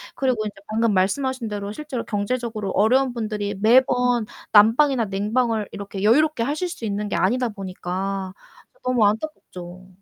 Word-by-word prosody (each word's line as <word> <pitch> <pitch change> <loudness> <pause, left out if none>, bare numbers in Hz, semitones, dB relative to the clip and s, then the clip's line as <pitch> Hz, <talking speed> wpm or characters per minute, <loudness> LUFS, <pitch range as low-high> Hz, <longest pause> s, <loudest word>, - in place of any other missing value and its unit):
그리고 255 -5 0
인제 210 - -5
방금 225 0 +1
말씀하신 235 +6 0
대로 205 -1 -4
실제로 275 -3 -5
경제적으로 215 -1 -2
어려운 250 +7 +3
분들이 210 -3 -3
매번 245 0 +3 0.3
난방이나 230 +4 +5
냉방을 215 +2 0
이렇게 200 -1 -6
여유롭게 255 +5 +3
하실 300 +8 -2
수 245 - -6
있는 205 0 -2
게 - - -2
아니다 245 +5 +1
보니까 190 -1 -4 0.4
저 - - -31
너무 250 -4 +2
안타깝죠. 185 - -4
220 Hz, 370 characters per minute, -23 LUFS, 200-250 Hz, 0.4 s, 난방이나